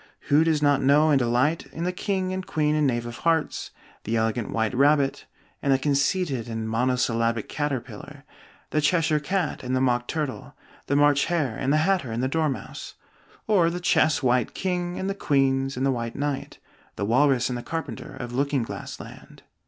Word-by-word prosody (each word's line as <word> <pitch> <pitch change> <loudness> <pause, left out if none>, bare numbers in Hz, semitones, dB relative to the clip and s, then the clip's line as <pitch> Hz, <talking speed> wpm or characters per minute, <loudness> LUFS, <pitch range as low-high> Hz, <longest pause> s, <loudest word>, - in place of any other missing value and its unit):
Who 150 +3 +5
does 160 -2 +1
not 145 -1 +3
know 150 +3 +4
and 140 - +4
delight 125 +6 +1
in 165 - -6
the 180 - 0
King 185 0 -2
and 190 0 -3
Queen 150 -3 0
and 150 -1 +2
Knave 120 -2 -1
of 120 0 -7
Hearts, 165 -2 0 0.3
the 115 - -2
elegant 110 0 -1
White 110 0 -1
Rabbit 140 +1 +2 0.3
and 140 - +1
the 135 - +5
conceited 140 - 0
and 110 -1 -4
monosyllabic 115 -1 0
Caterpillar, 140 -1 -5 0.5
the 155 - +1
Cheshire 155 0 +2
Cat 180 +2 -2
and 130 +1 -2
the - - +2
Mock 120 -2 +1
Turtle, 150 -5 -4 0.3
the 140 - +1
March 145 0 +4
Hare 155 -9 -1
and 130 - -1
the 155 +1 +3
Hatter 180 -11 +1
and 115 +2 -2
the - - +2
Dormouse; 150 -1 -3 0.5
or 185 -6 +3
the 175 +1 -4
chess 155 -4 +2
White 125 -2 +1
King 180 -2 -2
and 190 - -3
the 195 - 0
Queens 135 -6 +1
and 130 - 0
the 135 - +3
White 115 -2 -3
Knight, 145 -1 -3 0.4
the 100 - -2
Walrus 130 +2 +3
and 125 - -2
the 120 - -4
Carpenter, 155 -6 -6
of 120 0 -6
Looking 140 0 0
Glass - - -7
Land? - - -12
140 Hz, 190 wpm, -25 LUFS, 125-155 Hz, 0.5 s, Who